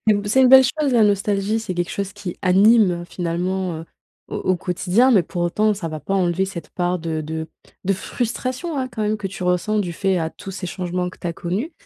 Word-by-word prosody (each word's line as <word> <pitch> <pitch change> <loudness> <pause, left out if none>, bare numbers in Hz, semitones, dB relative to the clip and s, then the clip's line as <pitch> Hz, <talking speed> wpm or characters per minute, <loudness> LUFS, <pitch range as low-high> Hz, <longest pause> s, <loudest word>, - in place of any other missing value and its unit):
C'est 210 -1 +5
c'est 260 +6 +4
une 255 - +6
belle 265 0 +9
chose 280 +1 0
la 235 - +5
nostalgie, 205 +1 +1
c'est 185 -5 -4
quelque 175 0 -2
chose 200 -1 -3
qui 180 -3 -6
anime, 200 +3 +5
heu, - - -7
finalement, 180 +1 -2
heu, - - -9 0.4
au - - -4
au 185 -1 +1
quotidien, 190 +8 +2
mais 200 -7 +5
pour 175 0 -4
autant 210 +5 +2
ça 185 -4 -5
va 155 -1 -6
pas 195 +7 -3
enlever 185 0 +1
cette 185 -3 -8
part 180 0 -1
de 160 -1 -3
de 160 +1 -5 0.4
de 195 - +2
frustration, 255 - -3
hein, 260 -1 -2
quand 245 -3 -4
même 215 +1 0
que 200 - -3
tu 190 -1 -7
ressens 180 +4 +1
du 180 -4 -1
fait 190 +1 0
à 160 0 -2
tous 195 - -9
ces 185 -1 -5
changements 180 0 -3
que - - -16
tu - - -6
as 170 - -1
connus. 200 - -3
190 Hz, 240 wpm, -21 LUFS, 175-215 Hz, 0.4 s, belle